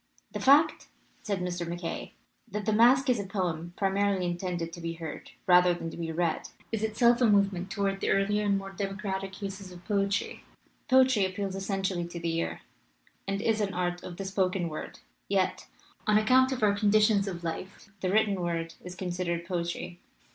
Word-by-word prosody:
"The -, -, -4 dB
fact," 300 Hz, +4 st, +4 dB, 0.3 s
said 200 Hz, -3 st, -2 dB
Mr. 180 Hz, -1 st, -2 dB
MacKaye, 170 Hz, -, -5 dB, 0.4 s
"that 210 Hz, +1 st, -4 dB
the 215 Hz, -, +2 dB
masque 250 Hz, +5 st, +5 dB
is 250 Hz, -3 st, +3 dB
a -, -, -2 dB
poem 175 Hz, -4 st, -2 dB
primarily 195 Hz, -1 st, +1 dB
intended 175 Hz, -1 st, -3 dB
to 170 Hz, -, -8 dB
be 165 Hz, 0 st, -3 dB
heard 165 Hz, -1 st, -7 dB, 0.2 s
rather 180 Hz, -1 st, +6 dB
than 165 Hz, -1 st, -5 dB
to -, -, -9 dB
be 165 Hz, -1 st, -3 dB
read, 165 Hz, 0 st, -1 dB, 0.2 s
is 225 Hz, -2 st, -1 dB
itself 235 Hz, +3 st, +3 dB
a 245 Hz, -, +6 dB
movement 200 Hz, -2 st, +2 dB
tow 200 Hz, +1 st, -1 dB
ard 195 Hz, 0 st, 0 dB
the -, -, -1 dB
earlier 205 Hz, +2 st, +2 dB
and 200 Hz, -1 st, +3 dB
more 195 Hz, 0 st, -6 dB
democratic 195 Hz, -1 st, -4 dB
uses 195 Hz, -1 st, -6 dB
of 180 Hz, 0 st, -13 dB
poe 200 Hz, -2 st, +1 dB
try. 195 Hz, -, -2 dB, 0.5 s
Poetry 260 Hz, -5 st, +5 dB
appeals 190 Hz, +1 st, -2 dB
essentially 190 Hz, -2 st, -2 dB
to 170 Hz, 0 st, -7 dB
the 165 Hz, -1 st, -1 dB
ear, 165 Hz, -, -2 dB, 0.7 s
and 195 Hz, +2 st, -2 dB
is 225 Hz, -1 st, +2 dB
an 195 Hz, -2 st, -1 dB
art 175 Hz, 0 st, -1 dB
of 175 Hz, -1 st, -8 dB
the 195 Hz, -, -4 dB
spoken 190 Hz, -2 st, 0 dB
word, 155 Hz, -, -7 dB, 0.3 s
yet, 190 Hz, -2 st, 0 dB, 0.4 s
on 210 Hz, 0 st, +5 dB
account 255 Hz, +5 st, +4 dB
of 255 Hz, -4 st, -2 dB
our 205 Hz, -1 st, +5 dB
conditions 210 Hz, 0 st, +3 dB
of 175 Hz, -3 st, -5 dB
life, 185 Hz, +5 st, -6 dB
the 185 Hz, -, -1 dB
written 205 Hz, -2 st, +2 dB
word 165 Hz, -1 st, -2 dB
is 180 Hz, 0 st, -8 dB
con 185 Hz, -1 st, -4 dB
sidered 170 Hz, -1 st, -2 dB
poetry. 175 Hz, 0 st, -4 dB
195 Hz, 190 wpm, -29 LUFS, 175-205 Hz, 0.7 s, rather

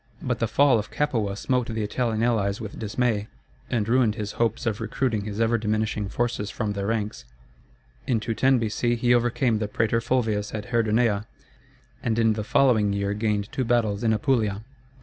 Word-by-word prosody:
But -, -, -2 dB
the -, -, +1 dB
fall 140 Hz, -5 st, +4 dB
of 105 Hz, -, -6 dB
Capua 115 Hz, -9 st, -1 dB
smote 125 Hz, +3 st, 0 dB
the 110 Hz, -2 st, -2 dB
Italian 115 Hz, +1 st, -1 dB
allies 105 Hz, -4 st, +1 dB
with 110 Hz, -3 st, -7 dB
dismay, 110 Hz, -1 st, -1 dB, 0.4 s
and 110 Hz, -3 st, 0 dB
ruined 120 Hz, -3 st, +3 dB
his 105 Hz, -1 st, -4 dB
hopes 115 Hz, -1 st, -1 dB
of 110 Hz, -3 st, -1 dB
recruiting 110 Hz, -6 st, -1 dB
his 105 Hz, 0 st, -5 dB
ever 115 Hz, 0 st, +2 dB
diminishing 105 Hz, -1 st, -1 dB
forces 115 Hz, -3 st, -2 dB
from 105 Hz, -1 st, -2 dB
their 100 Hz, -1 st, -3 dB
ranks. 105 Hz, -, -2 dB, 0.8 s
In 120 Hz, -3 st, +2 dB
210 125 Hz, +4 st, +2 dB
B.C. 120 Hz, +1 st, 0 dB
he 120 Hz, +1 st, +2 dB
overcame 120 Hz, -1 st, +2 dB
the 105 Hz, -, -1 dB
prætor 115 Hz, +2 st, 0 dB
Fulvius 110 Hz, -4 st, 0 dB
at 105 Hz, +1 st, -6 dB
Herdonea, 110 Hz, -2 st, +2 dB, 0.7 s
and 115 Hz, -2 st, -1 dB
in 115 Hz, -1 st, +3 dB
the 105 Hz, 0 st, -3 dB
following 110 Hz, -4 st, +3 dB
year 100 Hz, 0 st, -1 dB
gained 105 Hz, -1 st, -1 dB
two 130 Hz, -, -1 dB
battles 115 Hz, -3 st, +1 dB
in 115 Hz, -, +3 dB
Apulia. 110 Hz, -2 st, +1 dB
110 Hz, 175 wpm, -25 LUFS, 105-120 Hz, 0.8 s, fall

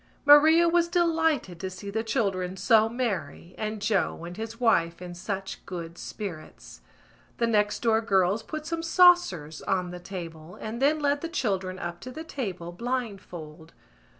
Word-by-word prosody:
Maria 315 Hz, +4 st, +7 dB
was 340 Hz, 0 st, +3 dB
delighted 320 Hz, -, +1 dB
to 190 Hz, -, -3 dB
see 195 Hz, +2 st, -8 dB
the 220 Hz, +2 st, -1 dB
children 190 Hz, -5 st, -1 dB
so 220 Hz, +2 st, +4 dB
merry 195 Hz, -, -3 dB
and 215 Hz, -1 st, -4 dB
Joe 205 Hz, -5 st, 0 dB
and 175 Hz, +1 st, -7 dB
his 225 Hz, +2 st, -6 dB
wife 170 Hz, -9 st, +2 dB
in 180 Hz, -1 st, -7 dB
such 190 Hz, +2 st, -5 dB
good 170 Hz, -2 st, -6 dB
spirits. 180 Hz, -5 st, -8 dB, 0.6 s
The 235 Hz, -, +2 dB
next 210 Hz, -1 st, +1 dB
door 225 Hz, -1 st, +3 dB
girls 195 Hz, -1 st, +2 dB
put 310 Hz, +6 st, -6 dB
some 330 Hz, +1 st, -3 dB
saucers 330 Hz, -, +4 dB
on 180 Hz, -2 st, -1 dB
the 180 Hz, -, -7 dB
table 170 Hz, -2 st, -8 dB
and 225 Hz, +3 st, -6 dB
then 295 Hz, +3 st, +4 dB
led 285 Hz, -1 st, 0 dB
the 335 Hz, -, -4 dB
children 190 Hz, -, -1 dB
up 175 Hz, -1 st, -5 dB
to 255 Hz, -, -7 dB
the 310 Hz, +6 st, -7 dB
table, 190 Hz, -, -5 dB
blindfold. 180 Hz, -8 st, -5 dB
210 Hz, 160 wpm, -27 LUFS, 180-260 Hz, 0.6 s, Maria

